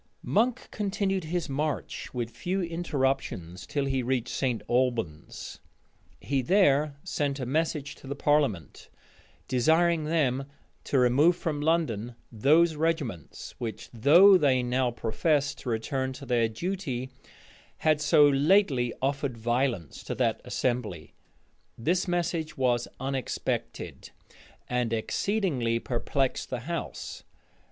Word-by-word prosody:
Monk 235 +3 +1
continued 195 -3 -1
his 175 +1 -2
march 145 +1 -3
with 120 -2 -3
few 175 +11 -2
interruptions 135 - -2
till 140 -1 -1
he 135 -1 0
reached 125 -1 -1
St. 125 -4 -1
Albans. 120 -11 -2 0.6
He 140 -1 -1
there 150 -3 +3
sent 140 -1 -2
a 130 - -2
message 150 +1 -1
to - - -13
the 140 - -3
parliament, 140 - 0 0.6
desiring 160 +5 +3
them 140 -4 +1 0.4
to 140 - +1
remove 135 +7 +4
from 150 -4 -3
London 125 -8 0 0.2
those 155 +9 +4
regiments 150 - -3
which, 115 -3 -6
though 175 - +7
they 130 -5 +3
now 125 +1 +1
professed 140 +5 0
to 125 - -6
return 130 +4 -1
to 140 +1 -10
their 120 -3 +2
duty, 130 - -4 0.7
had 155 -1 +2
so 150 0 +6
lately 140 - +3
offered 140 -2 -1
violence 120 - -1
to - - -3
that - - 0
assembly. 115 -10 -2 0.6
This 175 +11 0
message 170 -2 -1
was 120 -2 +1
unexpected, 135 -1 -3 0.6
and 125 -2 -1
exceedingly 130 - 0
perplexed 130 +3 -1
the 125 -3 -3
house. 170 +6 -5
135 Hz, 120 wpm, -28 LUFS, 120-160 Hz, 0.7 s, though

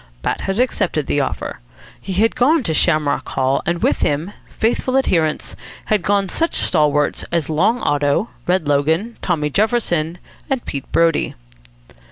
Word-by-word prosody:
Bat - - -1
had 195 +3 -2
accepted 190 - 0
the 145 - 0
offer. 135 - -3 0.4
He 195 - -5
had 220 +5 +2
gone 290 +4 +3
to 160 - -1
Shamrock 155 -2 +1
Hall; 130 +1 +1
and 170 0 -1
with - - +2
him, 150 +7 0 0.2
faithful 255 +3 0
adherents, 165 -12 0 0.3
had 215 -2 +1
gone 200 +2 +1
such 330 - -1
stalwarts 150 -3 +1
as 165 -3 0
Long 210 +10 +2
Otto, 145 +8 +1 0.2
Red 180 -4 +1
Logan, 160 +11 +1
Tommy 150 -5 -1
Jefferson, 180 - 0 0.3
and 265 -3 -1
Pete 140 -2 -5
Brodie. 165 -2 +2
170 Hz, 150 wpm, -19 LUFS, 150-215 Hz, 0.4 s, gone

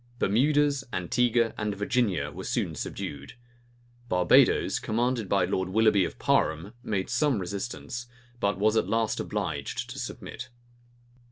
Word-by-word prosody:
Bermudas, 140 +6 +2
Antigua, 115 +5 +1
and 105 -1 -1
Virginia 100 - 0
were 95 +6 -8
soon 95 -7 -1
subdued. 70 -1 -6 0.8
Barbadoes, 90 -1 +4
commanded 115 -2 -1
by 100 -3 +3
Lord 95 0 -1
Willoughby 105 -1 +4
of - - -6
Parham, 80 +7 +1
made 100 -5 -2
some 145 -5 +1
resistance; 100 +5 -5 0.3
but 100 -4 +1
was 105 +2 +2
at 110 - +1
last 115 -1 0
obliged - - -3
to - - -7
submit. 125 - -7
105 Hz, 125 wpm, -27 LUFS, 95-120 Hz, 0.8 s, Barbadoes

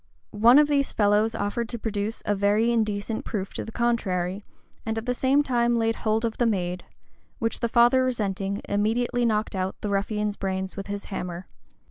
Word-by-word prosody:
One 230 +5 +6
of 295 0 +6
these 280 -2 +1
fellows 210 +1 +2
offered 215 +3 -2
to 235 - -4
produce 215 0 -3
a 205 - +2
very 205 +3 +2
indecent 215 -1 -1
proof 195 -3 -4
to - - -4
the 225 - -8
contrary, 200 -5 -1 0.4
and 225 0 -3
at 225 - -4
the 250 - 0
same 270 +3 +2
time 240 -3 +1
laid 225 0 +1
hold 220 +1 0
of 225 - -3
the 240 - +3
maid; 180 -4 -1 0.5
which 225 0 -2
the 235 - -1
father 240 +2 +5
resenting, 200 -5 -2
immediately 235 +4 +1
knocked 215 -1 0
out 185 0 -2
the 205 - -2
ruffian's 210 +1 -1
brains 190 0 -3
with 195 - -6
his 200 0 -5
hammer. 180 -1 -5
215 Hz, 185 wpm, -25 LUFS, 200-235 Hz, 0.5 s, One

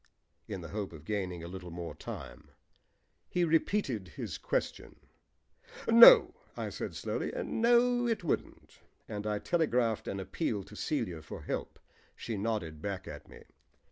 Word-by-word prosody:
in 100 -4 -5
the 80 - -8
hope 100 -3 -4
of 80 -1 -12
gaining 90 -4 -3
a - - -6
little 90 0 -8
more 85 0 -6
time. - - -9 0.8
He 180 - +1
repeated 160 - +1
his 80 - -6
question. - - -2 0.9
"No," 230 +1 +10 0.2
I - - -3
said - - -5
slowly, - - -3
"no, 240 +1 +3
it 225 -5 -1
wouldn't," 165 - -3 0.3
and 105 0 -4
I 105 -1 0
telegraphed 125 -6 +1
an 100 - -3
appeal 105 - -2
to 105 - -13
Celia 105 - -2
for 75 - -9
help. - - -4 0.4
She 115 - -5
nodded 100 -7 -2
back 100 0 -4
at 75 -1 -9
me. - - -14
105 Hz, 145 wpm, -31 LUFS, -, 0.9 s, No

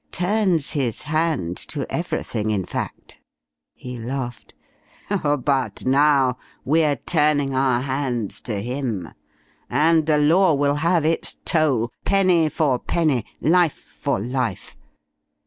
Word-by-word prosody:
Turns 180 -4 +1
his 130 -8 -2
hand 155 - -1
to - - -3
everything, 110 0 -2
in 100 -4 -1
fact." - - -6 0.6
He 125 -1 -8
laughed. 120 0 -5 0.5
"But 145 -8 0
now 135 -1 +3 0.3
we're 150 0 +3
turning 150 -1 +1
our 130 -2 +2
hands 130 -5 -2
to 105 -3 -1
him, 120 -8 -3 0.6
and 155 +4 +3
the 155 -1 +3
Law 165 +3 +4
will 145 +1 +1
have 170 -1 +2
its 165 +1 -1
toll, 135 -8 +1
penny 185 -5 +3
for 145 -6 +1
penny, 150 -10 0 0.2
life 170 -1 +3 0.2
for - - -1
life. 120 -2 -3
140 Hz, 115 wpm, -22 LUFS, 125-160 Hz, 0.6 s, Law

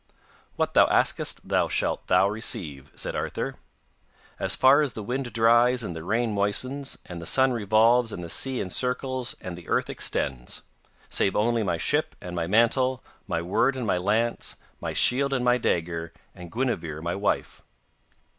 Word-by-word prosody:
'What - - -1
thou - - +6
askest - - +1
that - - +1
shalt - - -1
thou 95 - +4
receive,' 85 - -4
said - - -5
Arthur, - - -3 0.9
'as - - +2
far 135 +3 +6
as 140 -6 -1
the 110 - -6
wind 125 +3 -3
dries 120 +2 +4
and 90 -5 -5
the 80 - -6
rain 115 +4 0
moistens, 130 +8 -1
and 85 -1 -8
the 85 - -5
sun 130 0 +4
revolves 115 +2 +3
and 90 - -6
the - - -6
sea 130 +9 +1
encircles 125 +5 -2
and 90 -1 -6
the 85 -1 -12
earth - - 0
extends. 65 -3 -3 0.4
Save 95 - +1
only 115 +2 +2
my 90 -5 0
ship - - 0
and 90 0 -7
my 85 -1 -2
mantle, 120 +5 +2 0.2
my 85 - -2
word 125 +9 +1
and 125 - -3
my 90 -4 +1
lance, 110 +5 0 0.2
my - - -4
shield 140 +2 +3
and 125 -2 0
my 125 0 +3
dagger, 85 -5 -1 0.2
and 90 -1 -11
Guinevere 100 - -2
my 85 0 -2
wife. 100 +1 -2
110 Hz, 170 wpm, -26 LUFS, 90-125 Hz, 0.9 s, thou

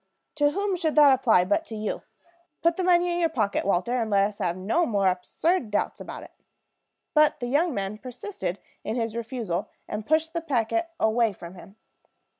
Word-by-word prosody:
To 290 -1 +4
whom 395 +4 -1
should 325 -4 -1
that 290 -3 +8
apply 230 -9 +4
but 205 - +1
to 225 - -7
you? 215 0 -3 0.6
Put 335 0 +3
the 370 - -2
money 350 -1 +3
in 345 - -1
your 335 -1 +2
pocket, 215 -10 0
Walter, 190 +3 +1
and 235 -3 0
let 200 -1 +4
us 200 0 -2
have 175 0 -1
no 225 - +1
more 200 -4 +1
absurd 215 - 0
doubts 205 - -1
about - - -8
it." - - -13 0.8
But 305 -1 +4
the 245 - -3
young 290 +4 +1
man 200 +2 -3
persisted 255 - -5 0.3
in 220 - -3
his 230 -2 -2
refusal, 225 -5 -3 0.2
and 210 +1 -4
pushed 315 +5 +1
the 335 - -2
packet 290 +3 0
away 220 0 +2
from 170 -1 -10
him. 195 +2 -14
235 Hz, 195 wpm, -26 LUFS, 205-320 Hz, 0.8 s, that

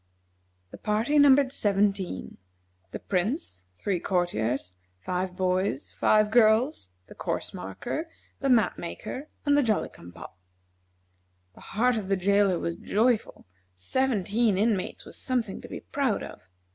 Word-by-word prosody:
The - - -11
party 225 +8 +1
numbered 280 -1 +6
seventeen: 195 - 0 0.5
the - - -5
Prince, 185 - -2
three 190 - -1
courtiers, 130 - -1 0.3
five 180 - -3
boys, 185 -4 -1
five 215 0 +3
girls, 220 - +3 0.2
the - - -13
course - - -3
marker, 245 - -5 0.3
the 275 - 0
map 235 -4 +3
maker, 260 - -6 0.2
and 285 0 +4
the 290 - +5
Jolly 220 -5 0
cum 85 - -13
pop. 90 +1 -12 1.1
The - - -17 0.2
heart 245 +1 +3
of 205 -3 -4
the 195 0 +1
jailer 200 0 +3
was 170 0 -3
joyful; 225 +2 0 0.3
seventeen 215 - +1
inmates 210 -2 0
was - - -7
something 245 -6 -1
to - - -10
be - - -7
proud 275 -6 -1
of. - - -11
205 Hz, 135 wpm, -27 LUFS, 180-245 Hz, 1.1 s, numbered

